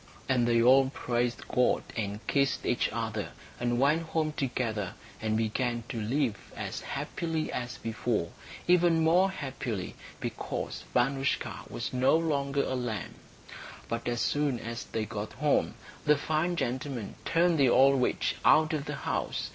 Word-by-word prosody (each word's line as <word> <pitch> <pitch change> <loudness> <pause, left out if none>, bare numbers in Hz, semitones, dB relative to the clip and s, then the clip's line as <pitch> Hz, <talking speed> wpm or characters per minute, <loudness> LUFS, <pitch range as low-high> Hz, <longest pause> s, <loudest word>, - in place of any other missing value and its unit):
And 125 -2 +2
they 120 -1 +4
all 130 +2 +6
praised 120 -5 -2
God 125 0 +2
and 105 -1 -3
kissed 140 -1 +1
each 120 - +1
other, 110 -2 -3 0.3
and 120 0 0
went 145 +5 +4
home 160 -1 -1
together, 115 -8 -2 0.3
and 110 -1 0
began 120 +2 0
to 115 - -3
live 120 +1 -1
as - - -4
happily 165 -2 -3
as 125 0 -4
before, 115 -5 -2 0.4
even 175 -2 +4
more 180 +4 +5
happily, 130 - -4 0.3
because - - -4
Vanoushka 135 +2 0
was - - -4
no 130 +5 +4
longer 140 -4 0
a - - -2
lamb. 120 -6 -3 0.7
But 115 +1 -3
as 120 -1 0
soon 145 -3 +1
as 115 +1 -5
they 110 -1 -3
got 105 -1 -5
home 150 +1 +1 0.3
the 150 -1 +4
fine 160 +4 0
gentleman 125 -5 -3
turned 165 -1 +3
the 135 -3 +5
old 135 +1 +5
witch - - 0
out 155 +1 +5
of 150 -2 -2
the 150 - -4
house. - - -2
130 Hz, 150 wpm, -29 LUFS, 115-150 Hz, 0.7 s, all